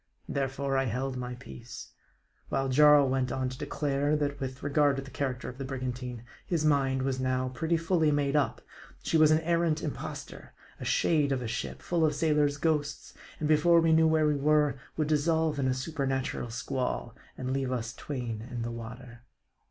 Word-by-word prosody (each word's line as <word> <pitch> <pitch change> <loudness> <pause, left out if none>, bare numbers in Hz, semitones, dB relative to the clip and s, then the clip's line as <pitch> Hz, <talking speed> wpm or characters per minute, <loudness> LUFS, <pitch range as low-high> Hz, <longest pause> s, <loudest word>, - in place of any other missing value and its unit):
Therefore 135 0 -1
I 135 - +1
held 130 +3 -2
my 125 0 -4
peace; 65 - -10 0.6
while 135 0 0
Jarl 145 +1 +6
Went 130 -1 0
on 130 0 -1
to 125 - -8
declare, 145 0 0
that 145 -1 -1
with 130 -1 -5
regard 145 0 +3
to 135 - -4
the 135 - -12
character 130 -3 -3
of 125 - -8
the - - -3
brigantine, 125 -2 -5 0.2
his 165 -3 -1
mind 135 -3 +2
was 130 -1 -1
now 130 0 0
pretty 160 +7 0
fully 165 -1 +2
made 145 -1 +1
up; 145 - +1 0.4
she - - -1
was 155 -1 +6
an 155 +1 +4
arrant 170 -1 +1
impostor, 150 - -6 0.3
a - - -6
shade 150 -4 +2
of 130 -2 0
a - - -3
ship, 115 - -4
full 170 -2 +1
of 150 -2 +2
sailors' 150 -2 +2
ghosts, 150 -2 -1 0.3
and 155 - -1
before 155 +3 +5
we 165 -1 +3
knew 160 0 +5
where 160 -1 +3
we 150 -1 +2
were, 150 -1 +2 0.2
would 155 -2 +1
dissolve 155 0 +1
in 135 - +1
a 130 - +2
supernatural 135 -3 -2
squall, 120 - -3 0.2
and 130 0 -3
leave 135 -1 -1
us 120 -2 -3
twain 120 -5 -5
in 120 -2 -4
the 120 - -3
water. 120 +1 -9
140 Hz, 190 wpm, -29 LUFS, 130-150 Hz, 0.6 s, Jarl